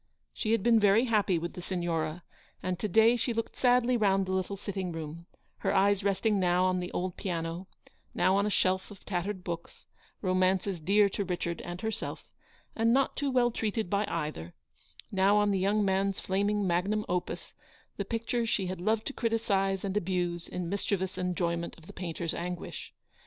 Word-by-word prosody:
She 215 - -2
had 230 - +1
been 230 -1 +5
very 210 +3 +5
happy 210 -6 +2
with 170 +1 -4
the 180 - -7
Signora; 170 -2 -2 0.4
and 185 -1 -2
to 215 - -1
day 225 +4 +5
she 240 0 -1
looked 230 - -3
sadly 250 0 +3
round 195 -4 +3
the 185 - -4
little 190 +1 -1
sitting 190 -2 -4
room, 165 +1 -7 0.3
her - - 0
eyes 200 0 +3
resting 200 +1 +2
now 180 0 +3
on 185 0 +2
the 180 0 -4
old 180 0 -3
piano, 170 -1 -3 0.5
now 190 - +3
on 200 +1 +2
a - - +1
shelf 190 -2 +1
of 205 -2 -13
tattered 185 0 -2
books, 170 -1 -6 0.4
romances 185 0 +1
dear 200 +6 +4
to 200 - -2
Richard 175 -2 -3
and 175 +1 -6
herself, 220 -1 -4 0.5
and 230 +1 +3
not 270 +2 +2
too 285 -1 -1
well 250 -2 +3
treated 220 -3 -2
by 205 +1 +1
either; 150 - -4 0.6
now 195 +1 +4
on 205 0 +3
the 195 - +1
young 205 +2 +2
man's 195 0 0
naming 200 +2 +1
magnum 190 +4 +1
opus, 180 0 -3 0.4
the - - -1
picture 230 +1 -1
she 205 -4 +1
had 185 -1 -4
loved 220 +3 +1
to 275 - -4
criticise 200 -5 0
and 195 0 -2
abuse 175 -3 -1
in 180 -1 -4
mischievous 190 0 -2
enjoyment 170 -2 -1
of 165 - -16
the - - -11
painter's 170 -2 -3
anguish. 175 0 -5
190 Hz, 185 wpm, -30 LUFS, 180-210 Hz, 0.6 s, been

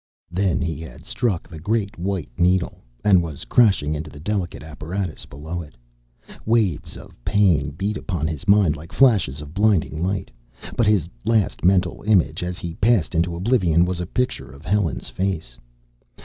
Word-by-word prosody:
Then 95 0 +1
he 80 -3 -2
had 80 -1 -10
struck 105 -9 -1
the 80 - -10
great 105 +4 -1
white 90 -7 -3
needle, 90 +3 +1 0.2
and 95 -4 +6
was 80 -4 -6
crashing 95 -11 +3
into 75 +1 -4
the 75 0 -12
delicate 90 -1 -3
apparatus 80 +3 -5
below 80 +5 -6
it. 75 -6 -12 0.7
Waves 110 -8 0
of - - -14
pain 90 -6 +3
beat 100 +8 -3
upon 85 -5 -3
his 80 -3 -4
mind 100 -7 +5
like 80 +2 -11
flashes 100 - +3
of 75 0 -10
blinding 95 -6 +2
light. 95 -3 -2 0.4
But 115 - +2
his 100 -6 +3 0.2
last 110 -3 +1
mental 90 -1 +2
image, 85 -7 +3
as 90 0 -3
he 85 -1 -5
passed 105 -2 +2
into 85 +1 +1
oblivion, 90 -4 +3
was 90 -1 -2
a 90 - -3
picture 125 +5 -2
of 70 +2 -14
Helen's 95 -6 0
face. 80 -11 -3
90 Hz, 165 wpm, -22 LUFS, 80-100 Hz, 0.7 s, and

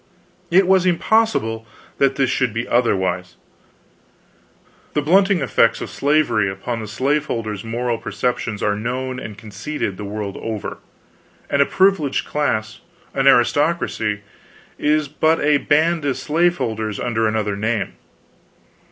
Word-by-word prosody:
It 185 +3 +5
was 185 0 +4
impossible 170 - +1 0.3
that 135 -1 +3
this 135 -2 +1
should 125 -5 0
be 115 +2 -2
otherwise. 95 -7 0 1.6
The 150 - +2
blunting 190 +3 +4
effects 120 -3 +2
of - - -6
slavery 140 -9 +2
upon 115 +5 -4
the 110 - -6
slaveholder's 115 -4 -1
moral 115 +1 -2
perceptions 120 -4 -2
are 105 - +1
known 125 +4 -3
and 105 -4 -8
conceded, 110 0 -5
the 105 - -6
world 100 -1 -5
over; 110 -2 -5 0.7
and 140 - +3
a 140 - +4
privileged 190 -8 +2
class, 115 -7 -1 0.3
an 135 0 +1
aristocracy, 135 -5 +2 0.6
is 150 0 +2
but 155 +3 +1
a 145 0 +3
band 155 +3 +2
of 135 -3 0
slaveholders 130 - 0
under 115 -2 0
another 110 -2 -1
name. 105 0 -1
125 Hz, 125 wpm, -20 LUFS, 110-150 Hz, 1.6 s, It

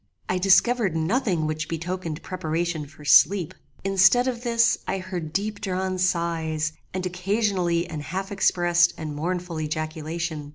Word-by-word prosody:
I 185 - 0
discovered 195 +1 +3
nothing 175 - 0
which 155 0 -3
betokened 165 -1 -4
preparation 165 -3 -2
for 150 0 -15
sleep. 175 +3 +5 0.3
Instead 195 +6 +4
of 240 -2 -2
this 235 -1 +2
I 195 - -1
heard 180 -4 -5
deep 205 +4 -2
drawn 185 -2 -2
sighs, 165 -3 0 0.2
and 185 0 -3
occasionally 180 -2 0
an 155 -1 -6
half 190 +7 -5
expressed 175 -3 +3
and 155 -2 -5
mournful 175 +1 -3
ejaculation. 155 0 -4
175 Hz, 135 wpm, -24 LUFS, 160-195 Hz, 0.3 s, sleep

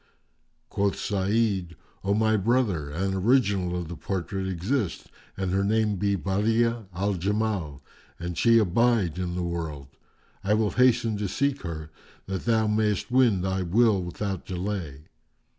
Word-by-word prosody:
Quoth 100 0 0
Sa'id, 100 -3 0 0.3
"O 100 +1 +1
my 110 0 +3
brother, 105 - +1
an 95 +6 -2
the 95 - -2
original 100 -5 +2
of 85 - -5
the 85 - -6
portrait 95 +2 -3
exist 95 +3 -2 0.3
and 95 -2 -1
her 95 +1 +1
name 105 0 +1
be 100 +1 +1
Badi'a 110 +4 0
al 100 +3 -1
Jamal, 95 -6 -2 0.3
and 85 0 -5
she 115 +4 +5
abide 110 -3 +2
in 90 -1 -2
the 90 - -2
world, 80 -5 -4 0.5
I 105 +2 +2
will 110 -1 +1
hasten 125 -3 +3
to 105 0 -2
seek 140 +7 0
her, 80 -3 -6 0.3
that 95 -1 -4
thou 110 -2 +3
mayst 105 0 0
win 120 -7 +4
thy 95 0 -1
will 100 +3 +3
without 95 +1 -4
delay. 90 -6 -4
100 Hz, 150 wpm, -26 LUFS, 90-110 Hz, 0.5 s, she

